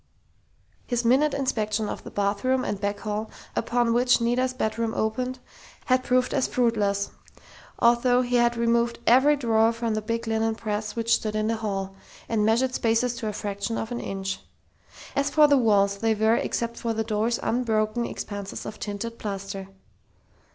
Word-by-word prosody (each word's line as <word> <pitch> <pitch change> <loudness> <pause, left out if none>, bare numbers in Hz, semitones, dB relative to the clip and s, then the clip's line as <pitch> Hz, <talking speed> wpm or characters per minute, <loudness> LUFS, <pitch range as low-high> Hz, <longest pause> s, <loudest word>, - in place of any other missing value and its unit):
His 240 -1 -1
minute 275 +5 +3
inspection 215 -5 -1
of - - -5
the - - -8
bathroom 205 +6 0
and 205 -1 -3
back 205 0 -2
hall, 215 0 -3 0.3
upon 240 -1 +1
which 245 +1 +4
Nita's 245 +2 +1
bedroom 225 -2 -2
opened, 250 +4 -1 0.5
had 255 0 +2
proved 255 0 +1
as 265 - +1
fruitless, 210 -5 0 0.7
although 245 +1 +4
he 245 0 +1
had 240 0 +2
removed 235 0 +1
every 265 +5 +5
drawer 225 -4 +3
from 230 -1 -2
the 215 - -1
big 230 +2 -3
linen 225 0 0
press 210 -1 -3
which 230 0 +1
stood 215 -1 0
in 215 0 0
the 225 - 0
hall, 195 -3 -3 0.3
and 220 -2 +1
measured 235 +4 +2
spaces 230 +1 +1
to 225 - -4
a 210 - -2
fraction 205 +3 -3
of 225 - -4
an 240 - -3
inch. 195 0 -4 0.8
As 280 +1 +1
for 300 +1 +6
the 285 - +5
walls, 200 -5 +3
they 225 0 +2
were, 220 +2 +3
except 235 0 -2
for 230 -1 -2
the 220 - 0
doors, 220 +2 0
unbroken 225 -1 0
expanses 205 -3 -6
of 215 - -7
tinted 220 +3 -5
plaster. 195 -1 -5
230 Hz, 170 wpm, -25 LUFS, 210-245 Hz, 0.8 s, for